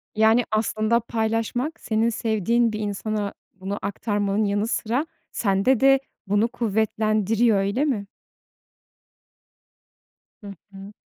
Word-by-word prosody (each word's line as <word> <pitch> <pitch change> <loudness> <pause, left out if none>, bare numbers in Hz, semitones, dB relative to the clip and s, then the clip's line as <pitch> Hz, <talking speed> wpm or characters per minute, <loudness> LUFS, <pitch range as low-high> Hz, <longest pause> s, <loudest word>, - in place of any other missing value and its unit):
Yani, 220 +2 +4
aslında 215 +1 +1
paylaşmak 225 +5 -2
senin 225 +1 +1
sevdiğin 230 +1 +1
bir 215 - -3
insana 210 0 -3 0.2
bunu 195 +2 -5
aktarmanın 205 0 -1
yanı 205 +2 0
sıra 245 +6 -1 0.3
sende 205 +4 +2
de 270 0 +5 0.3
bunu 205 +3 +2
kuvvetlendiriyor, 220 -1 +1
öyle 200 +9 0
mi? 215 -9 -1 2.4
Hı - - -8 0.2
hı. 195 +1 -11
220 Hz, 105 wpm, -24 LUFS, 205-235 Hz, 2.4 s, de